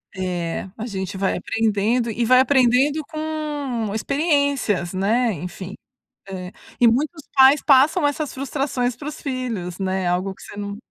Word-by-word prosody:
É, 180 -1 -3
a 225 - -5
gente 190 -3 -4
vai 190 0 0
aprendendo 225 +2 0
e 235 +2 -1
vai 255 +2 +6
aprendendo 265 +3 +3
com 300 -8 -3
experiências, 280 - 0
né. 220 +5 +1
Enfim. 180 +3 -7 0.6
Eh, 185 -1 -6 0.3
e 240 - +7
muitos 295 +6 0
pais 270 +2 +7
passam 290 +1 +5
essas 290 0 -2
frustrações 265 -2 -2
para 285 +4 -8
os - - -9
filhos, 240 - -4
né? 190 -1 -1
Algo 185 +2 0
que - - -18
você - - -11
não 200 0 -4
É. - - -8
240 Hz, 155 wpm, -22 LUFS, 195-280 Hz, 0.6 s, e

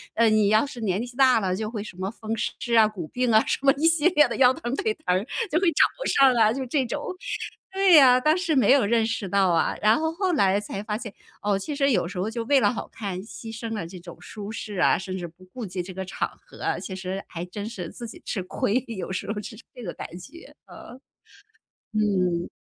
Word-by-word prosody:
呃， 230 0 +4
你 215 -2 +4
要 215 +6 +4
是 245 -4 -9
年 200 +1 0
纪 245 0 -12
大 260 -3 +5
了 185 -2 -1
就 215 +1 -3
会 215 -3 -5
什 200 - -10
么 190 +1 -3
风 225 0 -6
湿 235 +2 -3
啊、 220 -1 +7
骨 185 -7 -7
病 250 +3 0
啊 220 0 +5
什 - - -1
么 275 0 +5
一 320 +3 +3
系 330 0 +4
列 300 -5 +5
的 - - -4
腰 255 -1 +6
疼 240 +1 -4
腿 440 +6 0
疼 - - -30
儿 190 - 0 0.3
就 325 - +3
会 380 - +1
找 - - +5 0.3
上 270 -2 +6
来。” 220 -2 +4
就 265 -1 -3
这 260 +1 0
种。 295 +7 -4 0.6
对 380 -5 +7
啊， 255 -2 +7
当 305 +4 +3
时 335 -4 0
没 255 -2 +4
有 275 -4 +5
认 225 +1 +2
识 220 -4 -3
到 195 -1 +3
啊， 165 -1 +1
然 215 +5 +5
后 320 0 0
后 365 +1 -1
来 200 -8 +3
才 200 -1 -5
发 210 0 -3
现， 220 -4 -8 0.3
哦， 205 -1 +1
其 290 +8 -4
实 280 -1 +2
有 180 -6 +1
时 185 - -8
候 190 +4 -1
就 230 0 -3
为 280 +1 +4
了 210 +1 +2
好 - - -5
看 190 -4 -5
牺 225 +1 -9
牲 230 -1 -6
了 200 - -4
这 180 +1 -9
种 175 -1 -11
舒 210 0 -8
适 210 -2 -6
啊， 175 - +4
甚 190 0 -5
至 175 -1 -5
不 180 +3 -18
顾 250 - -6
及 180 -1 -4
这 185 +1 -9
个 190 +1 -4
场 - - -3
合 - - -13
啊， - - 0
其 190 - -6
实 190 +1 -5
还 170 0 -6
真 205 +4 -6
是 180 -7 -6
自 240 -2 -8
己 - - -11
吃 195 - -2
亏， 215 +6 -1
有 190 -5 -5
时 190 +2 -3
候 210 - -3
是 220 - -8 0.2
这 245 - -9
个 175 - -5
感 - - -7
觉， 335 - -13
啊。 - - -12 1.0
嗯。 185 -5 +1
220 Hz, 270 characters per minute, -25 LUFS, 190-255 Hz, 1.0 s, 啊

